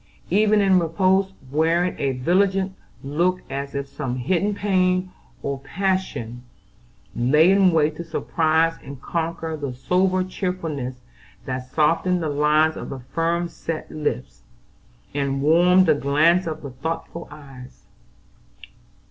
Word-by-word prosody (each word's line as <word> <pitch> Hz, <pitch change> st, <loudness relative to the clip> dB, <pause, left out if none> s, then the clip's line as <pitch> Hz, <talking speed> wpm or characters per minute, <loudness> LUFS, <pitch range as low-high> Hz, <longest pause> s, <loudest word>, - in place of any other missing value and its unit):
Even 210 Hz, +2 st, +4 dB
in 190 Hz, -2 st, +4 dB
repose 185 Hz, +3 st, +2 dB, 0.2 s
wearing 165 Hz, +4 st, +1 dB
a 135 Hz, -1 st, 0 dB
vigilant 190 Hz, +8 st, +1 dB, 0.3 s
look 175 Hz, +6 st, 0 dB
as 140 Hz, +1 st, -4 dB
if 140 Hz, 0 st, -3 dB
some 135 Hz, -2 st, -4 dB
hidden 185 Hz, +11 st, 0 dB
pain 185 Hz, -2 st, +1 dB, 0.3 s
or 140 Hz, -1 st, -3 dB
passion 165 Hz, -, -2 dB, 0.7 s
lay 150 Hz, +9 st, +4 dB
in 195 Hz, -2 st, +5 dB
wait 155 Hz, -1 st, +1 dB
to 170 Hz, -, -5 dB
surprise 165 Hz, 0 st, +1 dB
and 140 Hz, -1 st, -9 dB
conquer 165 Hz, +1 st, -3 dB
the 140 Hz, -4 st, -5 dB
sober 185 Hz, +7 st, +1 dB
cheerfulness 165 Hz, -8 st, -4 dB, 0.5 s
that 130 Hz, -1 st, -5 dB
softened 165 Hz, +4 st, +2 dB
the 155 Hz, -, -1 dB
lines 150 Hz, +2 st, +3 dB
of -, -, -7 dB
the 135 Hz, -2 st, -6 dB
firm 170 Hz, +1 st, 0 dB
set 165 Hz, -1 st, -6 dB
lips, 150 Hz, -, -4 dB, 0.7 s
and 140 Hz, -1 st, -1 dB
warmed 180 Hz, +4 st, +5 dB
the 160 Hz, -, +5 dB
glance 155 Hz, +6 st, +2 dB
of 155 Hz, -1 st, -5 dB
the 140 Hz, -, -6 dB
thoughtful 165 Hz, +5 st, -5 dB
eyes. 135 Hz, -4 st, -13 dB
165 Hz, 130 wpm, -23 LUFS, 140-185 Hz, 0.7 s, in